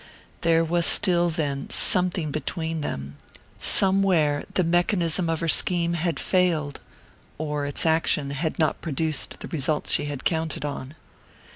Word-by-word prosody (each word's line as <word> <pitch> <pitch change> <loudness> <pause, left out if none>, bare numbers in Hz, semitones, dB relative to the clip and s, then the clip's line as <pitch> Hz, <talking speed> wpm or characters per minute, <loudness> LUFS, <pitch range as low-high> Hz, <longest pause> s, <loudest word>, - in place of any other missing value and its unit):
There 165 0 +2
was 170 +1 +1
still, 175 -3 +4
then, 145 -4 -3
something 180 -4 +2
"between" 160 +2 -3
them: 70 - -6 0.4
somewhere 190 -7 +3
the 185 - +1
mechanism 175 0 0
of 165 -1 -2
her 165 - -1
scheme 170 +1 +2
had 170 0 -2
failed, 165 -6 0 0.6
or 150 -2 -3
its 145 - 0
action 160 -3 +1
had 155 +3 -3
not 155 - 0
produced 155 -1 -3
the - - -6
result 150 -1 -2
she - - +2
had 145 -2 -6
counted 160 -2 -1
on. 140 0 -6
160 Hz, 140 wpm, -24 LUFS, 145-170 Hz, 0.6 s, still